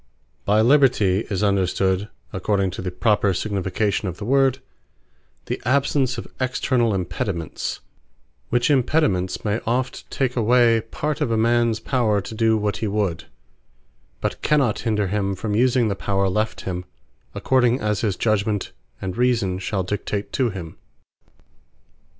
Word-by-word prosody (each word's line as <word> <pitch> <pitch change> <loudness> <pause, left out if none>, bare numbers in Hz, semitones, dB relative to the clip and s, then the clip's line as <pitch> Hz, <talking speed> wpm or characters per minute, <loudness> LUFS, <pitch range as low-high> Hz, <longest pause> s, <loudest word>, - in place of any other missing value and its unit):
Liberty - - -42
What - - -41
By 110 - +5
LIBERTY, 120 -7 +4
is 100 -1 -1
understood, 95 0 +1 0.2
according 100 -3 0
to 90 - -6
the 90 - -3
proper 100 +1 +1
signification 100 +1 -1
of 90 -1 -5
the 105 - -6
word, 135 +1 +3 0.9
the - - -4
absence 130 0 +1
of 115 - -5
externall 130 -3 +1
Impediments: 90 -3 -3 0.7
which 120 +4 +2
Impediments, 125 - +1
may 105 +2 0
oft 125 +2 -2
take 130 -3 -1
away 120 -1 +4
part 150 +4 -3
of 145 - +1
a 115 - +1
mans 115 0 +2
power 115 -4 +1
to 100 - -7
do 110 0 +2
what 105 -3 -1
hee 110 - -2
would; 100 -5 -1 1.0
but - - -3
cannot 140 -8 +2
hinder 105 -3 0
him 100 0 -1
from 105 +2 -3
using 120 +1 +3
the 100 - -1
power 100 0 0
left 105 +3 -1
him, 90 -1 -4 0.5
according 125 -1 +2
as 105 -1 -1
his 105 -5 0
judgement, 105 -2 0 0.3
and 95 -1 -3
reason 115 -7 +1
shall 95 0 -2
dictate 100 +2 -3
to 130 -3 +1
him. 90 -6 -8
110 Hz, 150 wpm, -22 LUFS, 95-120 Hz, 1.0 s, By